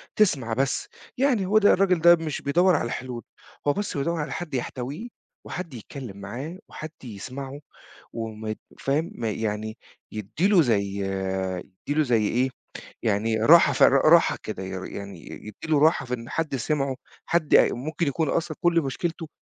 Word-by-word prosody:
تسمَع 135 - +2
بس 135 +3 0 0.3
يعني 250 -8 +2
هو 210 +3 +3
ده 205 -1 +6
الراجل 185 -3 +3
ده 170 +1 +8
مش 160 -3 -4
بيدوّر 175 +5 +3
على 145 - 0
الحلول، 120 0 -5 0.4
هو 145 - +4
بس 205 -6 -3
بيدوّر 165 +4 -1
على 150 - -4
حد 175 -5 -5
يحتويه 130 - -4 0.4
وحد 170 -6 -6
يتكلم 115 -2 -8
معاه، 130 - -6
وحد 155 0 -7
يسمَعه 130 +5 -7 0.5
وما 110 -1 -5
ي 110 - -3 0.2
فاهم؟ 145 +5 0
ما 115 -2 -2
يعني 110 +1 -3 0.3
يدّي 110 - -1
له 195 -5 +6
زَي 100 -6 +1 0.7
يدّي 100 +9 -6
له - - +6
زَي 115 -5 +2
إيه، 130 +2 +1 0.5
يعني 110 +1 +1
راحة 160 +10 +7
ف - - +3
راحة - - +6
كده 95 - -5
ي 95 - -5 0.2
يعني 100 -3 -7
يدّي 105 -1 -10
له 155 -2 +3
راحة 155 -3 +4
في 125 - -4
إن 120 -1 -5
حد 155 -4 -1
سِمعه 135 +1 -1 0.3
حد 165 -3 +2
ممكن 155 +6 +2
يكُون 150 +2 0
أصلًا 165 -2 -1
كُلّ 175 -2 +3
مشكلته 160 +4 -3
140 Hz, 165 wpm, -25 LUFS, 115-165 Hz, 0.7 s, ده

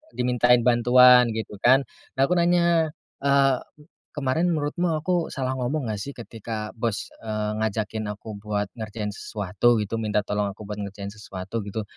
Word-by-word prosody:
dimintain 125 -1 +3
bantuan, 125 +1 +6
gitu 110 -2 -5
kan. 130 +5 +5 0.3
Nah, 135 - +3
aku 135 - +1
nanya, 170 -2 +2 0.2
eee, 140 -2 +3 0.6
"Kemarin 145 +4 0
menurutmu 155 +4 -1
aku 170 +2 0
salah 130 -3 -3
ngomong 135 +4 -1
nggak, 105 - -4
sih? 140 +7 -6
Ketika 110 -2 -6
bos, 115 -3 -2
eee, 110 -1 -3
ngajakin 110 0 -2
aku 105 0 -9
buat 105 -1 -3
ngerjain 105 -1 -4
sesuatu?" 105 +3 0
gitu. 115 +3 -4
"Minta 105 -2 0
tolong 105 0 -1
aku 110 - -11
buat 105 0 -6
ngerjain 100 0 -6
sesuatu?" 100 0 -6
gitu. 105 +2 -3
115 Hz, 155 wpm, -25 LUFS, 105-135 Hz, 0.6 s, bantuan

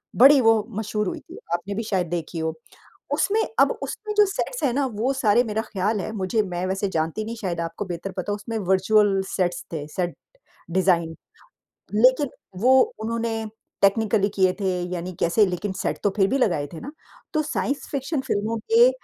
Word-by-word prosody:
बड़ी 275 +2 +8
वो 225 -2 +4
मशहूर 210 -2 -2
हुई - - -3
थी। - - -13 0.2
आपने 190 +4 -2
भी 225 - -2
शायद 190 -5 -1
देखी 170 0 -4
हो। 160 0 -1 0.6
उसमें 425 +2 +2 0.2
अब - - +6
उसमें 425 -1 -4
जो 420 - +8
सेट्स - - -3
हैं 260 - +2
ना 280 - +1
वो 225 +6 0
सारे 235 -3 +3
मेरा 220 0 -2
ख्याल 210 0 -1
है, 215 - -4
मुझे 210 +1 0
मैं 180 -2 -3
वैसे 195 +1 -1
जानती 160 +7 -1
नहीं, 230 - -5
शायद 175 -4 -2
आपको 165 +4 -4
बेहतर 180 +2 -5
पता 185 +2 -3
हो, - - -1
उसमें 215 +2 -6
वर्चुअल 195 +1 +4
सेट्स 180 -2 -1
थे, 150 -3 -4
सेट 175 0 -2 0.6
डिजाइन। 170 -3 +2 0.8
लेकिन 255 +6 +4 0.3
वो 255 +3 +5 0.3
उन्होंने 225 0 -2 0.4
टेक्निकली 205 0 +3
किए 185 -2 +3
थे 190 -2 0
यानी 180 +1 -4
कैसे 205 +6 +4
लेकिन 185 +2 -3
सेट - - -1
तो 205 - +4
फिर 195 -1 +4
भी 270 - +1
लगाए 170 - +1
थे 160 - -7
ना। 285 - -7 0.4
तो 310 - +2
साइंस 290 -2 -2
फ़िक्शन 280 +1 -2
फ़िल्मों 220 +1 -1 0.2
के 475 +2 +8
205 Hz, 185 wpm, -24 LUFS, 185-230 Hz, 0.8 s, बड़ी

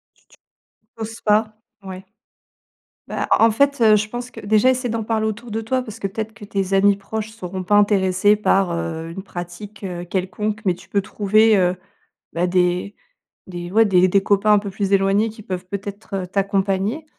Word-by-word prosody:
T - - -32
tu - - -22 0.6
oses 225 +1 -7
pas? 215 0 +1 0.3
Ouais. 190 0 -8 1.0
Bah, - - -3
en 225 - +5
en - - +4
fait 280 +2 +2
heu, 215 -2 +6
je 210 0 -1
pense 245 +2 -6
que, - - -10
déjà, 215 +5 +3
essaye 250 -2 -1
d'en 225 -1 -2
parler 220 -1 0
autour 225 +2 -5
de 220 +1 -2
toi, 255 +3 -1
parce 225 -2 -9
que 195 - -1
peut-être 220 +2 -5
que 205 - -11
tes 195 -1 -3
amis 200 +1 +4
proches 215 +2 -5
seront 185 -4 -6
pas 205 +3 +2
intéressés 205 0 +3
par, 195 -3 +2
heu, 165 -1 -4
une 190 +3 -7
pratique, 190 +3 -9
heu, 175 -2 -5
quelconque. 195 +4 -3
Mais 185 -2 +2
tu - - -17
peux 200 - +1
trouver, 215 +2 +3
heu, 180 -1 +2 0.6
bah, 175 +2 0
des 180 +2 0 0.5
des 175 -1 -7
ouais 225 +2 +5
des 185 -2 +4
des 195 +1 +3
copains 205 +1 +3
un 205 - +5
peu 200 -1 -6
plus 195 0 -3
éloignés, 195 +3 +3
qui 215 0 -12
peuvent 185 -2 -5
peut-être, 200 +1 -7
heu, - - -7
t'accompagner. 195 - -1
200 Hz, 200 wpm, -21 LUFS, 185-220 Hz, 1.0 s, heu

